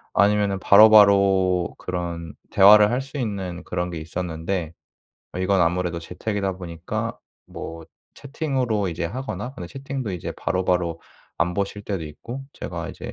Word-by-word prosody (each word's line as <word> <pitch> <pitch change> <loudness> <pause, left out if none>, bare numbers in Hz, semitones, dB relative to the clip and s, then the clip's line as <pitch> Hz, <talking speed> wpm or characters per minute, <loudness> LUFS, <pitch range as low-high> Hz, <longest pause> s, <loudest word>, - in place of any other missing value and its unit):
아니면은 100 0 +3
바로바로 100 -3 +6
그런 85 -3 -5 0.2
대화를 105 +2 +7
할 125 +2 0
수 135 +2 -8
있는 95 -7 -4
그런 90 0 -2
게 85 - -5
있었는데 85 +1 -4 0.7
이건 95 +1 +2
아무래도 85 0 +1
재택이다 95 +3 -3
보니까 85 -3 -5 0.3
뭐 80 0 -8 0.3
채팅으로 130 - -1
이제 85 0 -3
하거나 130 +5 -5
근데 90 - -7
채팅도 135 -1 -5
이제 90 - -5
바로바로 90 -3 -1 0.4
안 90 0 +1
보실 100 +1 -3
때도 95 -6 -3
있고 115 - -8
제가 - - -6
이제 - - -8
95 Hz, 315 characters per minute, -23 LUFS, 85-105 Hz, 0.7 s, 대화를